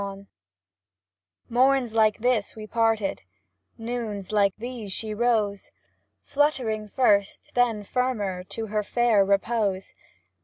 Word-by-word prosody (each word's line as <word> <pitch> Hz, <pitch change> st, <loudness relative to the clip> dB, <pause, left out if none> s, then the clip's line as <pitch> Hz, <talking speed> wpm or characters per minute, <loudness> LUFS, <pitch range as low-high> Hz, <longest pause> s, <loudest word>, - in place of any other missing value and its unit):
XLV 200 Hz, 0 st, -6 dB, 1.3 s
JVloRNS 255 Hz, -1 st, +3 dB
like 215 Hz, -2 st, +3 dB
these 235 Hz, -3 st, 0 dB
we 215 Hz, -1 st, -8 dB
parted; 225 Hz, -2 st, 0 dB, 0.6 s
Noons 225 Hz, -4 st, -5 dB
like 200 Hz, -2 st, +2 dB
these 235 Hz, -3 st, -6 dB
she 215 Hz, +2 st, -2 dB
rose, 210 Hz, -3 st, 0 dB, 0.5 s
Fluttering 250 Hz, -8 st, 0 dB
first, 205 Hz, -3 st, +1 dB
then 235 Hz, -4 st, +1 dB
firmer, 205 Hz, -6 st, -2 dB
To 225 Hz, +4 st, -5 dB
her 215 Hz, 0 st, -1 dB
fair 225 Hz, -1 st, +3 dB
repose. 200 Hz, -1 st, 0 dB
220 Hz, 110 wpm, -25 LUFS, 200-240 Hz, 1.3 s, JVloRNS